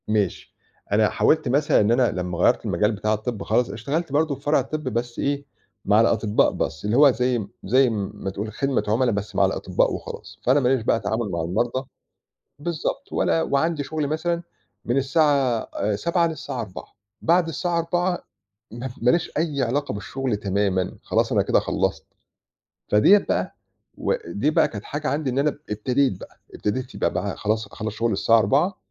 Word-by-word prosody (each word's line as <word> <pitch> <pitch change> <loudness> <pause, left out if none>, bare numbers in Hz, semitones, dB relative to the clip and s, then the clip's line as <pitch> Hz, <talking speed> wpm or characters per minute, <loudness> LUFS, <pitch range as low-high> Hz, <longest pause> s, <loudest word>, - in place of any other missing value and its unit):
ماشي. 105 -4 -1 0.4
أنا 105 +1 +4
حاولت 155 -2 +2
مثلًا 140 +4 +3
إن 105 +2 +2
أنا 120 0 +3
لمّا 90 -1 -3
غيرّت 90 - +3
المجال 105 +1 +1
بتاع 105 0 -1
الطِب 110 0 -3
خالص، 115 +1 +1
اشتغلت 140 - -3
برضه 150 0 +1
في 140 - -16
فرع 145 +2 +2
الطِب 155 0 -4
بس 120 -1 -3
إيه، 140 0 -1 0.4
مع 105 +2 +5
الأطِبّاء 110 -2 +2
بس 80 - -3
اللي 105 +4 +1
هو 145 -1 +8
زي 125 -3 0 0.2
زي 130 +5 +4
م 105 -4 -3
ما 95 - -5
تقول 100 +3 -5
خدمة 135 +3 0
عُملا 120 +4 +2
بس 105 0 -4
مع - - +4
الأطِبّاء - - 0
وخلاص، - - -8
فأنا 130 +4 +4
ماليش 130 -1 +2
بقى 115 - +2
تعامل 110 -1 -2
مع 85 - -1
المرضى 120 +10 -1 0.7
بالضبط. 170 - -3
ولا 165 - +2
وعندي 155 +1 0
شُغل 150 +1 -2
مثلًا 170 +3 -1 0.4
من 120 - +1
الساعة 135 -4 +2
آآ 105 +1 0
19:00 170 - +1
للساعة 150 -6 -5
16:00، 95 -5 -8 0.4
بعد 170 +1 +3
الساعة 170 +2 -1
16:00 175 +2 -1 0.5
م 120 +4 -5
ماليش 160 +9 +2
أي 150 -4 0
علاقة 140 +4 -1
بالشُغل 120 +3 -3
تمامًا، 100 -2 0
خلاص - - 0
أنا - - +3
كده - - +2
خلّصت. - - -1 0.8
فديّة 105 - +6
بقى 200 - -2 0.4
و - - 0
دي 150 - 0
بقى - - +4
كانت 105 -2 -8
حاجة 145 +1 -4
عندي 145 -1 -1
إن 130 +2 -1
أنا 145 +2 +3
اب 145 - -8
ابتديت 120 0 0
بقى، - - -13
ابتديت 125 +5 -3
يبقى - - 0
بقى - - -2
خلاص 110 +1 -1
أخلّص 110 +1 -5
شُغل 115 +1 0
الساعة 115 +3 +4
16:00 145 - +2
125 Hz, 180 wpm, -23 LUFS, 105-150 Hz, 0.8 s, هو